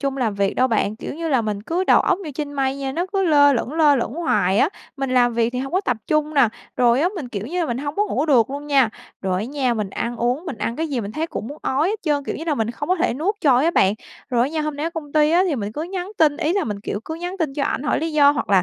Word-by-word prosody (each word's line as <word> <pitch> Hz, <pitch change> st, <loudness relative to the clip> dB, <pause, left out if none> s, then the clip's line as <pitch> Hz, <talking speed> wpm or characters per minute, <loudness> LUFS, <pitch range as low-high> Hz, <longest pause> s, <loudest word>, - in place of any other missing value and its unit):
trung 275 Hz, -1 st, -2 dB
làm 230 Hz, -6 st, 0 dB
việc 200 Hz, -1 st, 0 dB
đâu 255 Hz, -, +3 dB
bạn, 215 Hz, -1 st, 0 dB
kiểu -, -, -6 dB
như 330 Hz, +1 st, -4 dB
là, 260 Hz, -5 st, +2 dB
mình 210 Hz, -2 st, -3 dB
cứ 350 Hz, -, -1 dB
đầu -, -, +5 dB
óc 370 Hz, -, +1 dB
như 330 Hz, -7 st, -7 dB
trên 290 Hz, -1 st, -4 dB
mây 270 Hz, -1 st, -1 dB
nha, 270 Hz, -1 st, -3 dB
nó 345 Hz, +5 st, -1 dB
cứ 390 Hz, -, +1 dB
lơ 285 Hz, -3 st, +5 dB
lửng, 250 Hz, +2 st, -2 dB
lơ 305 Hz, -3 st, +4 dB
lửng 240 Hz, +2 st, -2 dB
hoài 205 Hz, -, +1 dB
á, 300 Hz, -, +4 dB, 0.3 s
mình 270 Hz, -1 st, -2 dB
làm 245 Hz, -2 st, +3 dB
việc 230 Hz, 0 st, +1 dB
thì 250 Hz, -, -2 dB
hông 270 Hz, +3 st, -4 dB
có 370 Hz, -, +2 dB
tập 250 Hz, -, -1 dB
trung 305 Hz, 0 st, 0 dB
nè, 270 Hz, -5 st, +5 dB, 0.3 s
rồi 245 Hz, +1 st, +4 dB
á 345 Hz, -, +3 dB
mình, 280 Hz, -8 st, -5 dB
kiểu 210 Hz, -1 st, -5 dB
như 355 Hz, +5 st, -2 dB
là, 330 Hz, -, 0 dB
mình 240 Hz, -3 st, -2 dB
hông 285 Hz, +1 st, -4 dB
có 415 Hz, -, +2 dB
ngủ 300 Hz, -3 st, -1 dB
được 250 Hz, -5 st, +4 dB
luôn 285 Hz, +1 st, -5 dB
nha. 275 Hz, -5 st, +4 dB, 0.3 s
Rồi 185 Hz, -1 st, 0 dB
á -, -, -3 dB
nha, 260 Hz, -1 st, -1 dB
mình 210 Hz, -3 st, -3 dB
ăn 240 Hz, +4 st, -3 dB
uống, 245 Hz, +7 st, -1 dB
mình 270 Hz, -9 st, -5 dB
ăn 230 Hz, -, -2 dB
cái 320 Hz, +1 st, -1 dB
gì 270 Hz, -5 st, -1 dB
mình 210 Hz, 0 st, -6 dB
thấy 315 Hz, +2 st, -2 dB
cũng 225 Hz, -, -6 dB
muốn 290 Hz, -, -9 dB
ói 285 Hz, +6 st, +1 dB
hết 430 Hz, +1 st, -2 dB
trơn, 290 Hz, -3 st, 0 dB
kiểu -, -, -3 dB
như 320 Hz, -, -6 dB
là, 315 Hz, -3 st, 0 dB
mình 225 Hz, -2 st, -1 dB
không 290 Hz, +5 st, -6 dB
có 370 Hz, -, +3 dB
thể 345 Hz, -7 st, 0 dB
nuốt 360 Hz, +10 st, -1 dB
trôi 270 Hz, -1 st, +4 dB
á 335 Hz, -, +3 dB
bạn. 195 Hz, -, +3 dB, 0.4 s
Rồi 240 Hz, -1 st, +3 dB
á 265 Hz, -, +1 dB
nha, 315 Hz, -, -1 dB
hôm 305 Hz, -1 st, -3 dB
nay 300 Hz, -, -3 dB
ở -, -, -2 dB
công 305 Hz, -4 st, -7 dB
ty 305 Hz, 0 st, +4 dB
á 350 Hz, +2 st, +4 dB
thì 315 Hz, -, 0 dB
mình 210 Hz, -1 st, -4 dB
cứ 300 Hz, -, -4 dB
nhắn 365 Hz, +2 st, -5 dB
tin, 295 Hz, -2 st, +4 dB
ý 330 Hz, 0 st, 0 dB
là 400 Hz, -, 0 dB
mình, 205 Hz, -2 st, -4 dB
kiểu, 205 Hz, -, -4 dB
cứ 320 Hz, -, -5 dB
nhắn 355 Hz, +3 st, -5 dB
tin 305 Hz, -6 st, -1 dB
cho 285 Hz, -, 0 dB
ảnh -, -, -1 dB
hỏi -, -, +1 dB
lý 325 Hz, 0 st, -2 dB
do 285 Hz, -2 st, +6 dB
hoặc 290 Hz, -, -2 dB
là 190 Hz, -3 st, +5 dB
285 Hz, 330 wpm, -21 LUFS, 240-320 Hz, 0.4 s, do